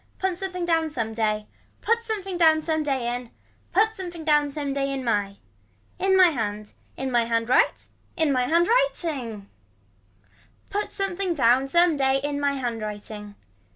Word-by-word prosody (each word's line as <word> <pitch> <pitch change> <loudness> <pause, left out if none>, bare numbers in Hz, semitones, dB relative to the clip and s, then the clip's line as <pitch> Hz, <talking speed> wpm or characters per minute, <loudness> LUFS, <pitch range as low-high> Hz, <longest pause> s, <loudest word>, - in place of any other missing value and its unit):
Put 380 -1 -1
something 365 -1 -4
down 325 -2 +1
some 230 -6 -3
day. 215 -1 0 0.4
Put 460 +1 +2
something 410 -5 -4
down 320 -2 +5
some 315 0 -1
day 265 -5 -1
in. 245 -1 -6 0.4
Put 435 +4 +3
something 350 -5 -7
down 295 -2 +3
some 285 -1 -3
day 275 0 -1
in 270 -1 -3
my. 205 -4 0 0.6
In 380 0 +3
my 370 -2 +7
hand. 210 -6 -4 0.2
In 265 0 -3
my 240 -1 +3
hand 230 0 0
right. - - +2 0.3
In 320 -4 +2
my 250 -2 +1
hand 335 +3 +3
writing. 305 - -1 1.2
Put 410 +1 -2
something 385 -2 -2
down 255 0 +3
some 340 +1 +3
day 265 -1 +2
in 290 0 -2
my 285 0 +1
hand 240 -4 -3
writing. 210 0 -7
285 Hz, 165 wpm, -25 LUFS, 235-350 Hz, 1.2 s, my